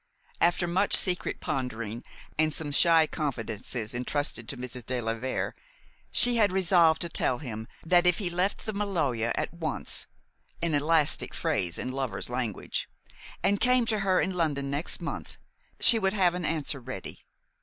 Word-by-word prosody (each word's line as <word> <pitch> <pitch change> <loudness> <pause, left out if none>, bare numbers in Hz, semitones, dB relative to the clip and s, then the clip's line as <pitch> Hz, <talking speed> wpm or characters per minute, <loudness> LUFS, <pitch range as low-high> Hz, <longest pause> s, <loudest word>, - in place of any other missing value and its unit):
After 175 +1 +3
much 185 +4 +3
secret 180 -2 0
pondering 120 - -3 0.3
and 155 0 +2
some 150 -1 -2
shy 165 +2 +5
confidences 115 -6 -3
intrusted 125 -1 -2
to - - -4
Mrs. 125 0 -7
de 125 +2 -2
la 115 -1 -1
Vere, 125 +3 -3 0.6
she 245 -1 +5
had 210 -4 +4
resolved 175 -4 +4
to 170 - +1
tell 130 -6 0
him 115 -5 -7 0.2
that 175 +1 +4
if 180 - +4
he 200 - -1
left 180 +4 -1
the 215 - -2
Maloja 155 - -1
at - - -3
once 165 -3 -3 0.5
an 170 -2 -1
elastic 150 +1 +2
phrase 85 -2 -1
in 130 - -3
lovers' 130 -5 -3
language 120 -5 -3 0.5
and 200 0 +2
came 250 -1 +3
to 220 -2 0
her 190 -2 +2
in 190 - 0
London 145 -6 -1
next 145 +4 -2
month, - - -6 0.4
she 230 - +7
would 190 -1 +1
have 185 -4 +3
an 180 -1 -3
answer 155 -3 -1
ready. 125 -6 -7
155 Hz, 165 wpm, -28 LUFS, 125-180 Hz, 0.6 s, she